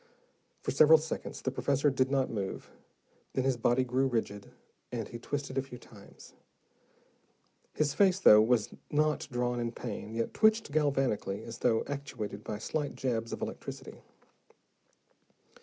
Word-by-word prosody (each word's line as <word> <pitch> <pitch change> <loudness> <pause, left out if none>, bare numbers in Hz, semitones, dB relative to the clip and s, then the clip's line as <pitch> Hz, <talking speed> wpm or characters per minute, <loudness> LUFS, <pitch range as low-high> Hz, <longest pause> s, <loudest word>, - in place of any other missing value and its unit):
For - - -1
several 155 +3 +7
seconds 160 +1 -5
the 130 - 0
professor 140 +2 +1
did 130 0 +1
not 135 -1 +1
move. 100 -4 -5 0.6
Then 130 - 0
his 135 -1 +2
body 120 +2 +2
grew 130 +2 +1
rigid, 110 -5 -3 0.4
and 115 -4 -3
he 120 - -8
twisted 135 +1 -3
a - - +1
few 130 -2 -10
times. 105 -4 -16 1.4
His 150 -2 +1
face, 190 +3 +4
though 110 - +7 0.4
not 150 0 +1
drawn 120 0 -1
in 120 -1 -2
pain, 115 -2 -6
yet 115 0 -2
twitched 220 -5 +3
galvanically, 135 -9 0
as 115 -1 -8
though 115 -2 +2
actuated 125 -8 -5
by 105 - -4
slight 145 +6 -3
jabs 115 -3 -2
of - - -4
electricity. - - -7
130 Hz, 140 wpm, -31 LUFS, 115-145 Hz, 1.4 s, several